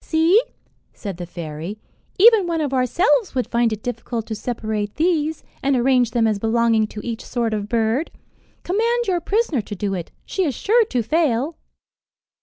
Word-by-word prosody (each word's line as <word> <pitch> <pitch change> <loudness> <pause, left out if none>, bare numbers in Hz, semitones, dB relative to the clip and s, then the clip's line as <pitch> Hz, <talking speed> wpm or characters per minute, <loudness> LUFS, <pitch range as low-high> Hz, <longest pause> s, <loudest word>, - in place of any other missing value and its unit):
"See," 330 +7 +4 0.5
said 200 -5 -6
the 175 -1 -6
fairy, 165 +3 -6 0.4
"even 430 -2 +6
one 335 -1 -1
of 290 -3 -1
ourselves 340 - +2
would 255 - +1
find 235 -1 +1
it 215 -1 -5
difficult 230 -1 -4
to 225 - -5
separate 215 -2 -3
these, 320 -2 0 0.2
and 275 0 +2
arrange 250 -1 +3
them 235 -1 +1
as 215 -2 +1
belonging 225 0 +2
to 210 0 -8
each 230 -1 -4
sort 235 -3 -2
of 210 -1 -3
bird. 230 +6 +1 0.5
Command 465 +5 +1
your 360 -4 0
prisoner 395 - 0
to 205 0 -7
do 200 +1 -2
it; 175 -3 -4 0.2
she 385 - -1
is 285 -8 -1
sure 455 - +3
to 250 - -1
fail." 300 +1 +1
245 Hz, 175 wpm, -21 LUFS, 220-330 Hz, 0.5 s, even